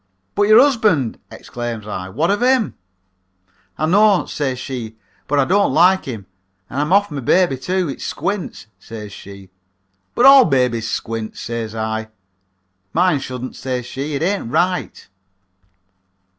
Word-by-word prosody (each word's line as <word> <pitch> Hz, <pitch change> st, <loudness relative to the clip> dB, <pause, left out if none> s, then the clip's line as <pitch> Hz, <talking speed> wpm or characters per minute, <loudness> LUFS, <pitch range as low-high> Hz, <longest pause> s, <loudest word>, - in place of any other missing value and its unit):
"'But 205 Hz, 0 st, +2 dB
your 215 Hz, +2 st, +7 dB
husband,' 220 Hz, -, +2 dB
exclaims 120 Hz, -3 st, -6 dB
I. 95 Hz, -3 st, -5 dB
'What 155 Hz, -, 0 dB
of 205 Hz, -, 0 dB
him?' 255 Hz, -3 st, +2 dB, 1.0 s
"'I 155 Hz, -, 0 dB
know,' 200 Hz, +3 st, +4 dB
says 135 Hz, -4 st, -3 dB
she, 125 Hz, -4 st, -6 dB, 0.3 s
'but 145 Hz, -, 0 dB
I 140 Hz, -, +3 dB
don't 200 Hz, +5 st, +2 dB
like 185 Hz, +3 st, +4 dB
him 110 Hz, -7 st, -6 dB, 0.5 s
and 140 Hz, -, -1 dB
I'm 150 Hz, +3 st, -2 dB
off 200 Hz, -1 st, +3 dB
my 145 Hz, -, -4 dB
baby, 175 Hz, +3 st, +2 dB
too. 180 Hz, +7 st, -2 dB
It 135 Hz, -, -6 dB
squints,' 200 Hz, -1 st, -4 dB
says 105 Hz, -1 st, -9 dB
she. 100 Hz, -2 st, -12 dB, 0.6 s
"'But 245 Hz, -, +3 dB
all 275 Hz, -1 st, +9 dB
babies 125 Hz, -6 st, 0 dB
squint,' 115 Hz, -1 st, -4 dB
says 115 Hz, -2 st, -5 dB
I. 110 Hz, 0 st, -3 dB, 0.9 s
"'Mine 175 Hz, -3 st, +2 dB
shouldn't,' 130 Hz, -1 st, -6 dB
says 125 Hz, -2 st, -4 dB
she. 140 Hz, +4 st, -5 dB
'It 140 Hz, -, -2 dB
ain't 195 Hz, -, -1 dB
right.' 180 Hz, +7 st, -1 dB
140 Hz, 145 wpm, -19 LUFS, 115-190 Hz, 1.0 s, all